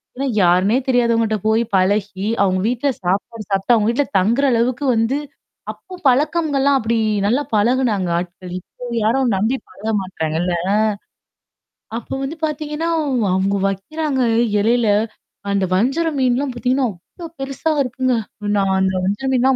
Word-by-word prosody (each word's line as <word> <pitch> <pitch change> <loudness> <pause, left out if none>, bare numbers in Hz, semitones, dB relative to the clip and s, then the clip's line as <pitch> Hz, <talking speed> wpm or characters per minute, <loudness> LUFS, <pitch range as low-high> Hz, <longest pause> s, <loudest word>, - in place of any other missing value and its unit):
ஏன்னா, 275 +2 -2
யாருன்னே 185 +6 +4
தெரியாதவங்கட்ட 230 -3 +2
போய் 220 +2 +3
பழகி, 195 +1 +1 0.2
அவங்க 185 -1 +1
வீட்ல 250 +4 0
சாப்பாடு 200 +5 -2
சாப்ட்டு, 195 +5 +2
அவுங்க 215 -2 +3
வீட்ல 270 +5 +2
தங்குற 235 +9 +2
அளவுக்கு 245 +4 0
வந்து 225 +5 +1 0.5
அப்போ 375 - -15
பழக்கம்கள்லாம் 280 0 +2
அப்படி 230 +1 0 0.3
நல்லா 245 +8 +2
பழகுனாங்க 215 -4 +1
ஆட்கள். 180 +1 -6
இப்போ 245 - -15 0.2
யாரும் 240 0 +2
நம்பி 220 +7 +1
பழக 220 +2 -4
மாட்றாங்க 160 -4 -3
இல்ல 180 0 0 0.2
அ? - - +2 1.3
அப்ப 235 - -9
வந்து 290 +5 -4
பார்த்தீங்கன்னா, 305 +2 -3
அவ் 260 -6 0
அவங்க 195 +1 +1
வைக்கிறாங்க 265 +8 -2 0.4
இலையில, 230 +2 +2 0.6
அந்த 195 -1 +1
வஞ்சர 275 - +1
மீன்லாம் 255 +1 +1
பார்த்தீங்கன்னா, 255 +1 0 0.3
அவ்ளோ 335 - -5
பெருசா 275 +4 -2
இருக்குங்க. 255 0 0 0.4
நான் 195 -1 +2
அந்த 190 0 +1
வஞ்சர 205 +8 -1
மீன் 255 - +2
எல்லாம் 265 0 +4
235 Hz, 140 wpm, -19 LUFS, 200-270 Hz, 1.3 s, யாருன்னே